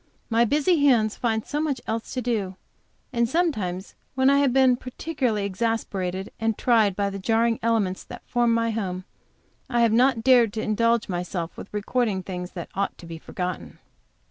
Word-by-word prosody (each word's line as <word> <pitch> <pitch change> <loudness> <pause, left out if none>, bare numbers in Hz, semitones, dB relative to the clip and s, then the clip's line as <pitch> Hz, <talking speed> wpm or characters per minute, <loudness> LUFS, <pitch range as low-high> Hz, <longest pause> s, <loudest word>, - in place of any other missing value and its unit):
My 230 +1 +4
busy 295 - +2
hands 225 -6 +4
find 220 -2 -1
so 295 - -2
much 290 -5 -1
else 225 +1 -3
to 255 - -2
do. 210 -6 -1 0.6
And 235 -1 +1
sometimes 215 - -1 0.2
when 265 +1 +4
I 280 - +4
have 280 -2 +3
been 260 -1 +4
particularly 250 -4 -2
exasperated 195 -3 -2
and 225 -1 0
tried 220 -6 +3
by 200 0 -1
the 195 - -5
jarring 225 +3 +1
elements 220 -5 0
that - - -10
form 240 -1 +2
my 230 0 +1
home, 185 -4 -3 0.7
I 240 -2 +1
have 230 -2 +4
not 245 -1 +3
dared 240 -4 +5
to 220 - -2
indulge 230 +1 +1
myself 175 -2 -4
with - - -10
recording 210 -1 -1
things 180 -1 -6
that 175 -3 -7
ought 200 +1 -2
to - - -12
be 165 -1 -8
forgotten. 180 +1 -5
225 Hz, 175 wpm, -24 LUFS, 195-245 Hz, 0.7 s, dared